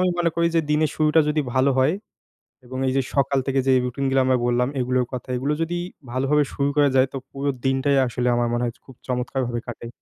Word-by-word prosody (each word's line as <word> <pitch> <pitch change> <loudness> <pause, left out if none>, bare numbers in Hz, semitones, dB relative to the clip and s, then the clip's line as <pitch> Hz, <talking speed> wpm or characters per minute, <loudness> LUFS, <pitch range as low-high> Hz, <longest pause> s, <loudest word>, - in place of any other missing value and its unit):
আমি 185 - +3
মনে 170 -1 +2
করি 170 0 +3
যে, - - +5
দিনের 150 -1 +2
শুরুটা 155 +1 +4
যদি 150 0 +1
ভালো 130 +2 +3
হয় 140 +7 +3 0.7
এবং 130 +1 -7
এইযে 135 +1 +2
সকাল 140 0 +2
থেকে 135 0 +1
যেই, 130 -1 +5
রুটিন 130 +3 -3
গুলা 135 0 +3
আমরা 130 -1 +3
বললাম 120 +1 +2
এগুলোর 125 0 +1
কথা, 125 0 -6
এগুলো 140 +4 -1
যদি 175 +2 -1 0.3
ভালোভাবে 135 +4 +2
শুরু 140 0 0
করা 145 -1 +4
যায় 130 0 +5
তো - - -3
পুরো 140 +1 -2 0.2
দিনটাই 135 +1 +2
আসলে 125 +1 -2
আমার 120 0 +1
মনে 120 +1 0
হয় 120 -1 -1
যে, - - -28
খুব 130 - -13
চমৎকারভাবে 125 -1 -2
কাটে। 115 0 -7
135 Hz, 220 wpm, -23 LUFS, 125-145 Hz, 0.7 s, যে